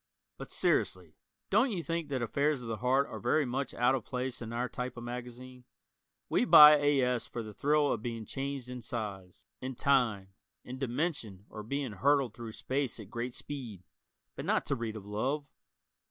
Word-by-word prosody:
But - - -7
seriously, - - 0 0.4
don't 270 - +4
you 185 -7 -2
think 165 -2 -3
that 130 -3 -1
affairs 140 +4 +1
of 120 - -8
the 110 -1 -3
heart 130 +4 +2
are - - -7
very 155 -2 +2
much 130 +3 -2
out 125 +2 +3
of 130 -4 -1
place 125 +1 -4
in 115 -1 -6
"our" 120 +2 -1
type 125 +1 -5
of 120 - -6
magazine? 125 +1 -8 0.6
We - - +2
buy 150 0 +10
A. 145 -1 +3
S. 125 -1 0
for 120 - -5
the 110 -1 -9
thrill 145 +4 +2
of 110 - -4
being 115 -1 -4
changed 135 -1 -4
in 125 -1 -6
size, 105 -6 -6 0.2
in 130 0 -4
time, 120 -9 +2 0.3
in 130 +1 -8
dimension 125 - -2
or 110 - -6
being 135 +3 -3
hurtled 135 +4 +2
through 115 -1 -8
space 130 -1 -2
at 105 -1 -10
great 120 +1 -4
speed, 120 -10 -7 0.5
but - - -5
not - - +1
to 140 - 0
read 115 -3 -4
of 105 -2 -8
love. 130 +8 -2
125 Hz, 190 wpm, -31 LUFS, 115-140 Hz, 0.6 s, buy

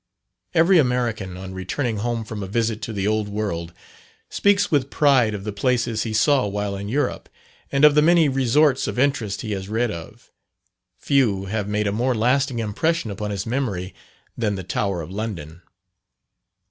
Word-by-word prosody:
Every 170 +2 +5
American, 120 -8 -1
on 95 0 -8
returning 110 +6 -2
home 115 +2 -2
from 105 -1 -6
a 95 - -4
visit 110 +1 -1
to - - -4
the 100 -3 -2
old 105 0 0
world, 100 -5 -3 0.6
speaks 200 0 +2
with 140 -3 +1
pride 130 -9 +3
of 100 - -6
the 105 - -3
places 120 +1 0
he 110 - -3
saw 125 +3 +3
while 100 0 -3
in 100 +1 -5
Europe; 145 +6 -2 0.4
and 140 +2 +4
of 150 - +7
the 150 - +5
many 165 0 +5
resorts 135 +1 +2
of - - -4
interest 125 -7 0
he 110 - -5
has 95 -1 -4
read 115 +1 0
of, 85 -4 -10 0.7
few 110 -9 +1
have 105 +1 -3
made 105 +1 -1
a 100 - +1
more 120 +4 0
lasting 125 +3 +1
impression 115 +5 -1
upon 105 +1 -4
his 100 -2 -3
memory 110 -7 -2 0.4
than 105 -4 -1
the 95 - -5
Tower 95 -1 -2
of 80 - -9
London. 90 -6 -5
110 Hz, 175 wpm, -22 LUFS, 100-130 Hz, 0.7 s, of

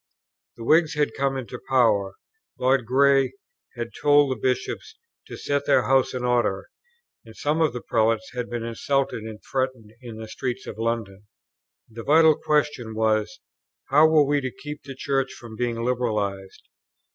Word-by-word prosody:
The 115 - -8
Whigs 155 +5 +3
had 150 -1 0
come 135 0 0
into 125 -1 -6
power; 105 -7 +2 0.4
Lord 130 -2 +2
Grey 135 +2 +3 0.4
had 120 -1 -4
told 145 -1 +5
the - - 0
Bishops 130 - -2 0.3
to - - -8
set 145 0 -2
their - - +4
house 130 -1 +2
in 125 - -3
order, 120 -6 0 0.5
and 115 -1 -15
some 150 +3 0
of 155 - +3
the 125 0 -6
Prelates 110 -1 +1
had 125 -1 -4
been 120 -1 -4
insulted 125 +2 -1
and 110 -1 -8
threatened 130 -5 -2
in 120 -3 -9
the 110 0 -7
streets 125 +3 -4
of 110 - -8
London. 110 -3 -3 0.6
The 115 0 -9
vital 160 +4 +5
question 145 -8 -1
was, 110 -1 0 0.5
how 150 +3 +6
were 155 -2 +4
we 145 0 +1
to 130 - -2
keep 150 0 -6
the 135 -1 -9
Church 135 0 -1
from 120 -2 -11
being 115 0 -2
liberalized? 105 -6 -2
125 Hz, 165 wpm, -24 LUFS, 110-140 Hz, 0.6 s, how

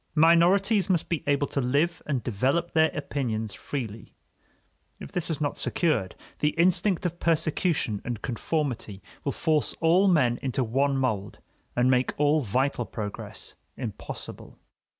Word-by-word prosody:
Minorities 180 +6 +4
must 175 -4 +1
be 170 -4 -1
able 145 0 +2
to 140 - -2
live 145 +7 +1
and 135 -5 -1
develop 135 - 0
their 160 0 +4
opinions 120 -8 -2
freely. 110 0 -6 0.8
If - - -9
this 175 -2 -1
is 160 - -1
not 145 -2 -1
secured, 130 - 0 0.2
the 150 0 +1
instinct 180 +2 +3
of 175 -1 -2
persecution 155 - 0
and 120 -3 -4
conformity 120 - -3 0.2
will - - 0
force 155 -2 0
all 175 +4 +4
men 130 -10 +3
into 130 0 -1
one 135 +4 +1
mold 110 -7 -1 0.4
and 125 +1 +3
make 125 0 +2
all 150 +1 +3
vital 125 +2 0
progress 105 -2 -6 0.2
impossible. - - -7
145 Hz, 140 wpm, -27 LUFS, 120-165 Hz, 0.8 s, Minorities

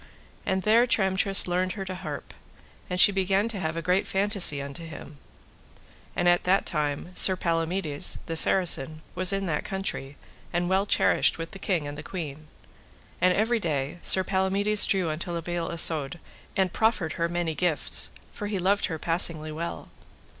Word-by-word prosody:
And 190 0 0
there 230 +3 +4
Tramtrist 195 -3 +3
learned 185 +1 0
her 195 -2 -6
to 185 - -5
harp, 185 - -7 0.6
and 180 0 -2
she 205 - +8
began 195 +2 +1
to 215 -4 -5
have 160 -2 -3
a 165 - -3
great 180 +3 +1
fantasy 195 -6 +4
unto 140 +4 -7
him. 155 -2 -10 1.0
And 175 - 0
at 175 0 +3
that 190 +2 +2
time 150 +1 -2
Sir 190 - +5
Palamides, 165 -3 -2
the 165 - -4
Saracen, 160 -3 +1
was 185 +1 +3
in 195 0 -1
that 155 -4 -2
country, 190 -8 -4 0.3
and 175 +1 -1
well 195 +2 +2
cherished - - +3
with 165 0 -6
the 195 - -10
king 180 -5 -1
and 145 - -6
the - - -5
queen. 155 -3 -7 0.7
And 180 0 +4
every 225 +3 +1
day 150 -3 -3
Sir 190 - +3
Palamides 195 +2 +1
drew 185 -5 +1
unto 160 +3 -5
La 170 -1 -3
Beale 175 0 -3
Isoud 165 -1 +1 0.4
and 190 -2 +1
proffered 220 -8 +1
her 170 0 -1
many 175 -2 -2
gifts, 165 -1 +1 0.2
for 205 - -6
he 205 -1 -2
loved 195 +3 +1
her 160 - -4
passingly 165 -1 +1
well. 165 +2 -6
175 Hz, 175 wpm, -26 LUFS, 160-195 Hz, 1.0 s, she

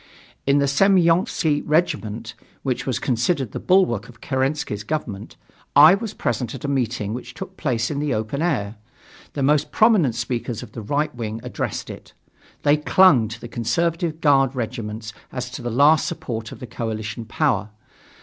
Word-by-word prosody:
In 140 +1 +4
the 140 - +3
Semyonofski 165 -1 +3
regiment, 115 -9 -1 0.3
which 130 -1 -2
was 130 - 0
considered 130 +1 0
the - - -5
bulwark 125 - +2
of 115 -2 -15
Kerensky's 130 -6 -2
government, 110 -7 -4 0.4
I 150 +4 +9
was 210 +1 -3
present 120 +2 -2
at 130 - -7
a - - 0
meeting 120 -6 -1
which 125 - -7
took 190 -1 -8
place 120 -8 -1
in 140 - -2
the 150 -1 -1
open 110 +5 -2
air. 115 -11 -1 0.6
The 140 - -2
most 145 +1 +2
prominent 205 - +4
speakers 120 -1 -3
of - - -11
the 115 - -7
right 145 +8 -1
wing 115 -2 -5
addressed 125 - -4
it. - - -12 0.5
They 145 +1 +4
clung 150 -6 +5
to 115 +2 -8
the 120 - -8
conservative 160 +8 -1
guard 135 -3 +4
regiments 110 -2 -5 0.2
as 125 -1 -5
to 130 - -7
the 120 - -3
last 145 +6 +4
support 115 -2 -5
of - - -9
the - - -7
coalition 110 -1 -5
power. 110 -5 0
130 Hz, 170 wpm, -22 LUFS, 115-150 Hz, 0.6 s, I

